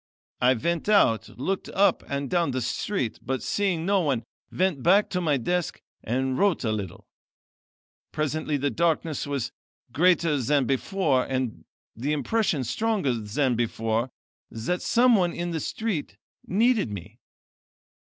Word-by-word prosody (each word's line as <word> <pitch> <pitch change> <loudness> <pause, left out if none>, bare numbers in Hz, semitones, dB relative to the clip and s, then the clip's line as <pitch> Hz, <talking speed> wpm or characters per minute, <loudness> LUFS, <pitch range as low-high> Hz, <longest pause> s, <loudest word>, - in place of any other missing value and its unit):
I 125 +1 +5
went 170 - -1
out, 155 - +4
looked 190 +9 -2
up 200 +1 +3
and 140 0 -2
down 170 +1 +1
the 130 -1 -2
street, 135 - -2
but 130 +2 -3
seeing 185 -5 0
no 200 +1 +3
one, 135 -8 0 0.3
went 185 -7 0
back 195 +7 +4
to 180 - 0
my 150 -5 +2
desk 175 +7 -1 0.2
and 130 +3 -1
wrote 200 -7 +2
a 110 - 0
little. 100 -4 -5 1.1
Presently 155 0 -1
the 140 0 -1
darkness 160 -3 0
was 140 -4 -2 0.4
greater 170 -2 +3
than 140 +2 +2
before, 135 0 +1
and 130 -3 -3 0.3
the 140 +7 -1
impression 150 - 0
stronger 195 - 0
than 120 +4 0
before, 115 +1 -1 0.4
that 120 +11 -3
someone 230 -8 +3
in 175 0 -3
the 165 - -2
street 200 -1 -3 0.3
needed 220 - +2
me. 100 -4 -8
150 Hz, 140 wpm, -26 LUFS, 130-180 Hz, 1.1 s, I